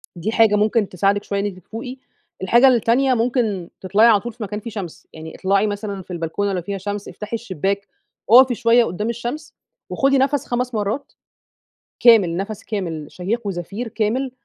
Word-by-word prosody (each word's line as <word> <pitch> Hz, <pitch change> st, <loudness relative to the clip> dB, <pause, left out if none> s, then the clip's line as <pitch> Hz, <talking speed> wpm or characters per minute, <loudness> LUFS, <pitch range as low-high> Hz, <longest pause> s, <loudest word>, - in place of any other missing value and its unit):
دي 180 Hz, +6 st, -3 dB
حاجة 225 Hz, -2 st, +4 dB
ممكن 210 Hz, 0 st, +1 dB
تساعدِك 195 Hz, +3 st, +1 dB
شوية 200 Hz, -, -2 dB
إن 200 Hz, -, -1 dB
أنتِ 200 Hz, -3 st, -4 dB
تفوقي، 235 Hz, +7 st, -8 dB, 0.5 s
الحاجة 235 Hz, +7 st, +5 dB
التانية 255 Hz, +2 st, +3 dB
ممكن 225 Hz, -7 st, -1 dB
تطلعي 200 Hz, +5 st, +4 dB
على 220 Hz, -3 st, +5 dB
طول 235 Hz, +4 st, -7 dB
في 230 Hz, 0 st, -7 dB
مكان 210 Hz, 0 st, -4 dB
فيه 230 Hz, -, -7 dB
شمس، 200 Hz, -7 st, -8 dB
يعني 160 Hz, 0 st, -9 dB
اطلعي 195 Hz, +2 st, +1 dB
مثلًا 205 Hz, -1 st, -4 dB
في 185 Hz, -, -13 dB
البلكونة 175 Hz, +4 st, -2 dB
لو 180 Hz, -, -2 dB
فيها 195 Hz, +3 st, -5 dB
شمس، 205 Hz, +1 st, -5 dB
افتحي 210 Hz, +2 st, -6 dB
الشباك، 200 Hz, -2 st, -3 dB, 0.4 s
أُقفي 255 Hz, +1 st, +7 dB
شوية 235 Hz, 0 st, +4 dB
قُدّام 210 Hz, +5 st, -3 dB
الشمس 240 Hz, +6 st, -5 dB, 0.4 s
وخدي 275 Hz, 0 st, +2 dB
نفس 275 Hz, +2 st, +1 dB
5 250 Hz, +1 st, -2 dB
مرّات، 215 Hz, +6 st, -3 dB, 0.9 s
كامل 200 Hz, -8 st, +5 dB
نفس 210 Hz, +3 st, -5 dB
كامل 170 Hz, -8 st, -4 dB
شهيق 205 Hz, +5 st, -3 dB
وزفير 195 Hz, +5 st, -4 dB
كامل 230 Hz, +5 st, -1 dB
210 Hz, 175 wpm, -20 LUFS, 195-235 Hz, 0.9 s, أُقفي